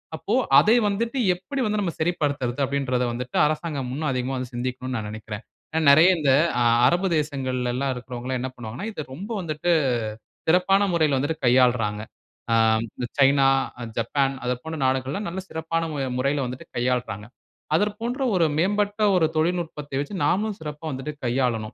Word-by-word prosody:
அப்போ 195 +7 -3 0.3
அதை 220 +3 +4
வந்துட்டு 230 +5 -1 0.2
எப்படி 270 +9 -5
வந்து 210 0 0
நாம் 170 -5 -3
சரிப்படுத்தறது 145 -6 -1
அப்படின்றத 135 -2 -1
வந்துட்டு, 125 +1 -4
அரசாங்கம் 150 -4 -3
இன்னும் 155 0 -1
அதிகமா 130 +1 -2 0.2
சிந்திக்கனும்னு 125 +1 -3
நான் 105 -1 -4
நினைக்கிறேன். 110 0 -7 0.5
நிறைய 160 +6 +7
இந்த 145 -3 +3 0.3
அ - - +4 0.2
அரபு 180 +3 +2
தேசங்கள்லல்லாம் 130 -3 -1
இருக்குறவங்கல்லாம் 125 +1 -5
என்ன 130 0 -3
பண்ணுவாங்கன்னா, 120 - -6
இதை 155 - -5
ரொம்ப 190 - -7
வந்துட்டு 160 0 -1 0.8
சிறப்பான 185 +3 +4
முறையில் 155 -5 +2
வந்து 145 +4 -1
கையாள்றாங்க. 120 -4 +3 0.5
ஆ - - +5 0.6
சைனா, 135 0 +5 0.5
ஜப்பான் 135 +4 0
அது 125 - +1
போன்ற 160 0 -5
நாடுகள்லாம் 130 +9 -1
நல்ல 180 +3 -5
சிறப்பான 165 +1 -2 0.3
முறையில 140 +2 0
வந்துட்டு 125 +1 -8
கையாள்றாங்க. 120 -4 -1 0.5
அதர் 205 +4 +1
போன்ற 245 +4 -3
ஒரு 170 - +4
மேம்பட்ட 205 +4 0
ஒரு 175 -3 +4
தொழில்நுட்பத்தை 160 -4 -2
வச்சி, 145 +7 -4
நாமளும் 210 +2 0
சிறப்பா 150 0 -7
வந்துட்டு 135 +3 -4
கையாளணும். 120 -3 0
140 Hz, 145 wpm, -24 LUFS, 125-170 Hz, 0.8 s, நிறைய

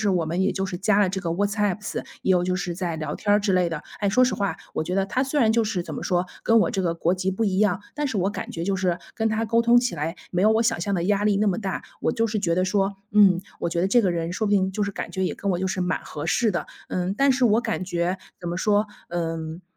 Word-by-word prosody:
我 170 -2 0
们 170 +4 -1
也 195 - +2
就 190 - -2
是 185 -2 -4
加 200 +2 +2
了 200 -3 +3
这 190 +1 -3
个 165 - -2
WhatsApps， 205 +2 -1 0.2
也 - - +2
有 180 -1 +3
就 185 0 0
是 180 -1 -3
在 175 -2 -2
聊 155 -1 -4
天 205 - +1
儿 205 - +5
之 205 -1 0
类 180 -1 +3
的。 165 -3 -4 0.2
哎， 205 - +1
说 255 +6 +4
实 250 - +1
话， 200 -1 -1 0.2
我 - - -1
觉 180 - -3
得 195 0 +1
他 255 +6 0
虽 280 +2 -1
然 220 -3 +4
就 230 0 +3
是 210 -4 -1
怎 175 - -7
么 - - -5
说， 180 -1 +1 0.2
跟 230 0 +5
我 - - +2
这 195 - -1
个 170 -2 0
国 170 +1 +1
籍 190 +1 -1
不 220 +4 -1
一 190 -2 +1
样， 200 -3 +2 0.2
但 295 - -1
是 245 -7 -2
我 190 +1 +1
感 205 - -6
觉 165 - -4
就 195 0 +1
是 185 -2 0 0.2
跟 225 -1 +1
他 220 +1 0
沟 230 +2 +3
通 235 +1 +5
起 245 0 -2
来， 160 +4 -3
没 180 - 0
有 215 +2 +5
我 220 +1 +3
想 225 0 +1
象 200 - -1
的 170 -3 0
压 205 +1 +2
力 210 -1 +3
那 210 +1 +2
么 185 - +1
大。 195 -4 -3 0.2
我 - - +1
就 230 0 +1
是 215 0 -2
觉 180 -5 0
得 185 +2 +2
说， 195 0 0
嗯， 195 -4 +6 0.2
我 - - 0
觉 170 - -1
得 180 - +2
这 240 +5 +4
个 190 -4 +2
人 170 0 -2
说 215 +3 -1
不 205 - 0
定 190 -2 +3
就 210 - 0
是 200 - -2
感 - - -5
觉 190 - -2
也 185 - 0
跟 200 - -3
我 175 - 0
就 190 - -1
是 190 - -2
蛮 180 0 -1
合 145 - -6
适 230 -4 +2
的。 175 - -3 0.2
嗯， 185 +1 -1
但 275 0 +4
是 255 -1 +2
我 220 +1 +4
感 220 -5 -2
觉 175 +1 -1 0.2
怎 175 - -4
么 175 - -3
说， 205 +2 +2 0.2
嗯， 165 -1 -3
195 Hz, 350 characters per minute, -24 LUFS, 180-215 Hz, 0.2 s, 嗯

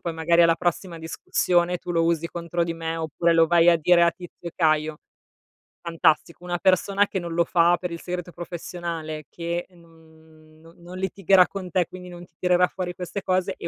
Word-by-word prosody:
poi 170 - -4
magari 170 +1 +3
alla 165 0 +4
prossima 175 -1 -2
discussione 175 +2 0
tu 180 - -8
lo 165 - +2
usi 170 0 0
contro 170 0 -3
di 165 -1 -4
me 165 0 -4
oppure 165 +1 0
lo 165 0 +5
vai 170 0 +4
a 170 - +4
dire 170 +2 +4
a 170 - +4
tizio 175 -1 -13
e - - -12
caio". 155 -2 +1 0.9
Fantastico, 170 0 0
una 175 -1 -3
persona 195 +2 +2
che 190 - -4
non 170 -2 -4
lo 170 +1 +3
fa 170 +1 +3
per 180 - -4
il 170 - -6
segreto 180 -1 -5
professionale, 170 -3 -6
che 170 0 -4
non 160 -2 -21
non 165 +1 -18
non 175 +1 -11
litigherà 190 -1 +3
con 185 -3 -7
te, 180 -2 +1
quindi 180 0 -11
non 175 0 -10
ti 165 - -34
tirerà 180 0 +3
fuori 180 -1 -5
queste 180 +2 -6
cose 185 +1 0
e 170 - -6
170 Hz, 200 wpm, -24 LUFS, 165-180 Hz, 0.9 s, lo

